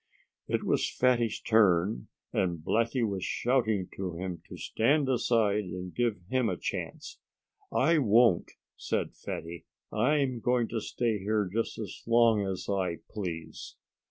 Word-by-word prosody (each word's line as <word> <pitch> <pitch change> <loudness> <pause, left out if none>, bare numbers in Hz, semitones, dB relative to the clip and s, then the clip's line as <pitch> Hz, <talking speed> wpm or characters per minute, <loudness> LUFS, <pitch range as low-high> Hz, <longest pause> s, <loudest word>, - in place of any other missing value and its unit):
It - - 0
was - - +1
Fatty's 120 -3 +1
turn, 95 - +3 0.3
and 90 -3 +1
Blackie 115 +1 +1
was 95 -2 -3
shouting 110 -7 +1
to 95 -2 -3
him 90 -1 -5
to - - -8
stand 140 +5 +1
aside 110 -5 +2
and 90 0 -6
give 115 -6 0
him 130 0 +1
a 90 - -2
chance. - - -5 0.5
"I 160 +4 +3
won't!" 115 - +4 0.3
said - - -2
Fatty. 85 +1 -7 0.3
"I'm 130 +2 +1
going 120 -1 +1
to 115 -1 -2
stay 115 -2 -1
here 105 +1 0
just 115 +1 -1
as 105 -4 -7
long 115 -3 +4
as 95 -1 -4
I 95 -4 -1
please." 90 -6 -6
110 Hz, 140 wpm, -29 LUFS, 95-120 Hz, 0.5 s, won't